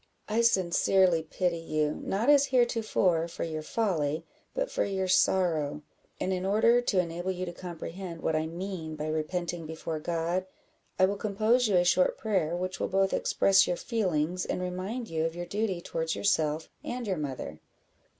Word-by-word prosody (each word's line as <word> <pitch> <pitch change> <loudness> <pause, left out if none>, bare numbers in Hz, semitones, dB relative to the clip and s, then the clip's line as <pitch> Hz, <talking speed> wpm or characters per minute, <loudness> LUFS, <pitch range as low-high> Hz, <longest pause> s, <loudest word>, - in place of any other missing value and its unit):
I 220 +2 +1
sincerely 185 -4 +3
pity 170 +2 -1
you, 155 -2 0
not 210 +6 -1
as 285 -1 +6
heretofore, 220 -9 +2
for 170 - -5
your 155 -2 -3
folly, 160 -5 -1 0.3
but - - -1
for - - +1
your 190 -1 -1
sorrow; 165 -6 +2 0.4
and 190 - 0
in 180 0 -2
order 220 +5 +4
to 210 -6 +1
enable 175 +1 -2
you 185 0 -3
to 175 - -6
comprehend 175 0 -7
what 160 - +1
I 155 0 0
mean 170 -2 -5
by 150 - -4
repenting 165 +2 -2
before 160 0 -4
God, 170 +3 -1 0.5
I 185 - +6
will 200 +2 -1
compose 220 +4 +2
you 205 - +2
a 175 0 +4
short 180 +1 +3
prayer, 185 -7 0
which 185 +1 -3
will - - 0
both 195 0 +2
express 195 -1 +4
your 175 - 0
feelings, 180 -7 -1
and - - -2
remind 185 +7 -4
you 160 -3 -1
of 165 0 -2
your 175 0 -4
duty 200 -2 -2
towards 165 -1 -2
yourself 160 -5 +1 0.2
and 245 0 -4
your 190 -4 -1
mother." 130 - -5
180 Hz, 175 wpm, -29 LUFS, 165-195 Hz, 0.5 s, as